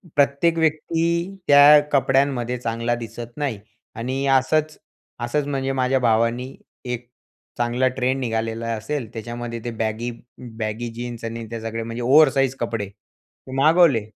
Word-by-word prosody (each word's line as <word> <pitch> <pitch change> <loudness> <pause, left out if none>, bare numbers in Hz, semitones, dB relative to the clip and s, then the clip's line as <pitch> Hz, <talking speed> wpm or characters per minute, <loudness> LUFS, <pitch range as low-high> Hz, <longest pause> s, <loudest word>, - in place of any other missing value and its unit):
प्रत्येक 145 +4 +2
व्यक्ती 160 +1 +1 0.4
त्या 145 +1 +8
कपड्यांमध्ये 135 -3 +1
चांगला 115 0 -1
दिसत 115 0 -8
नाही 140 -8 -2 0.4
आणि 130 +4 -2
असंच 150 +4 +2 0.4
असंच 140 +5 -1
म्हणजे 135 -1 -1
माझ्या 130 +1 +2
भावानी 120 +2 +1 0.3
एक 125 -1 -4 0.5
चांगला 120 +2 +1
ट्रेंड 130 +1 0
निघालेला 115 -1 -2
असेल. 115 +2 -4
त्याच्यामध्ये 120 +1 -5
ते 120 - -2
बॅगी 110 +2 -2 0.5
बॅगी 110 +2 -3
जीन्स 120 -1 -6
आणि 115 0 -5
ते 115 - -4
सगळे 115 0 -4
म्हणजे 115 +1 -5
ओव्हर 145 +4 +6
साईज 135 -2 +1
कपडे 115 -3 -2
ते 105 +5 -20
मागवले 155 -3 +5
120 Hz, 135 wpm, -22 LUFS, 115-135 Hz, 0.5 s, त्या